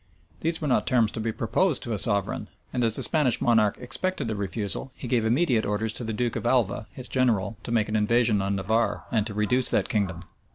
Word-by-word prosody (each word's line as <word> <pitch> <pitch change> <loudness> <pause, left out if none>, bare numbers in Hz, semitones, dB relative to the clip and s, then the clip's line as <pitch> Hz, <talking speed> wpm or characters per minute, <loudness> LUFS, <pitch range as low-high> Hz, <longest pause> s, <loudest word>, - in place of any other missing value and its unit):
These 165 +1 -1
were 155 - -3
not 130 - +1
terms 115 -4 +3
to - - -6
be 110 +1 -1
proposed 130 - 0
to 120 - -3
a 105 - -2
sovereign; 100 -3 -1 0.2
and 125 -1 0
as 115 -2 +5
the - - 0
Spanish 145 -7 +2
monarch 110 -4 +3
expected 125 +2 -3
a - - -2
refusal, 100 +4 -4
he 125 - -7
gave 115 -2 +1
immediate 120 -1 +2
orders 105 +1 -1
to 120 - -2
the 110 - -3
duke 120 +1 -1
of - - -3
Alva, 115 -4 +1
his 125 -1 -7
general, 115 -5 +1
to 115 - -7
make 110 -3 +2
an 105 - -2
invasion 110 0 +2
on 100 +1 -1
Navarre, 110 +5 0
and 110 -2 +1
to 105 - -7
reduce 125 +5 +2
that - - +1
kingdom. 95 -5 -1
115 Hz, 230 wpm, -26 LUFS, 105-125 Hz, 0.2 s, as